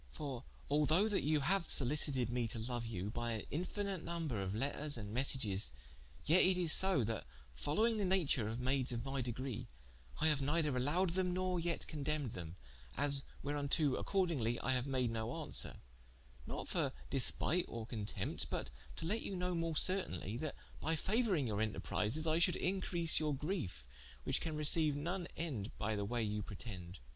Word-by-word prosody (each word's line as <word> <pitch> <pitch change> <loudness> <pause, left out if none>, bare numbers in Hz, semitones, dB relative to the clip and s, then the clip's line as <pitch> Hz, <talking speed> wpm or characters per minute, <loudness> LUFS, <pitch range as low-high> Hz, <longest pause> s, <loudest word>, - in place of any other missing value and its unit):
For 130 - -6 0.2
although 155 +7 +3
that 205 -2 +1
you 150 0 +2
haue 190 +6 +3
sollicited 135 -2 +4
mee 120 -1 0
to 115 - -2
loue 120 +2 -3
you, 105 -3 -4
by 120 0 -2
an 110 - -4
infinite 190 +2 -2
nomber 165 -11 -2
of 95 +1 -2
letters 140 +3 -1
and 105 -2 -6
messages, 115 - +3 0.5
yet 170 +5 +6
it 185 0 +5
is 175 -3 +5
so, 190 -8 +5
that 110 - -3 0.3
following 215 - +1
the 205 - +1
nature 170 - +2
of 115 +2 -3
maydes 130 0 +1
of 115 -1 -3
my 135 0 -2
degree, 125 0 -4 0.5
I 155 - +3
haue 145 -3 +2
neither 150 -1 +1
allowed 160 +8 +2
them, 180 +1 +1
nor 185 -1 0
yet 170 0 -1
condempned 150 -4 -2
them, 85 -1 -7 0.4
as 140 0 +3 0.2
wherunto 145 0 +1
accordingly 155 - 0
I 130 - +1
haue 125 +1 0
made 130 -3 +1
no 110 -1 -2
aunswere: 160 -1 -2 0.7
not - - -4
for - - 0 0.2
despite 155 +6 +4
or 115 -1 -5
contempt, 110 -3 -3
but - - -3 0.2
to 160 - -4
let 215 +7 0
you 195 - -4
know 180 0 -1
more 165 -2 -1
certainly, 115 - -1
that 155 +2 -4 0.2
by 160 +1 0
fauouring 195 - +1
your 105 -2 -1
enterprises, 110 +6 -1
I 160 +1 +2
should 180 +1 +4
increase 180 -3 +1
your 150 -2 0
griefe, 140 - -3 0.4
which - - 0
can 155 -2 -3
receiue 150 0 +2
none 175 +4 -2
ende 130 -12 -3
by 110 +1 -1
the 100 -1 -1
waye 120 +1 0
you 105 0 -1
pretende. 95 -4 -7
145 Hz, 175 wpm, -37 LUFS, 115-170 Hz, 0.7 s, yet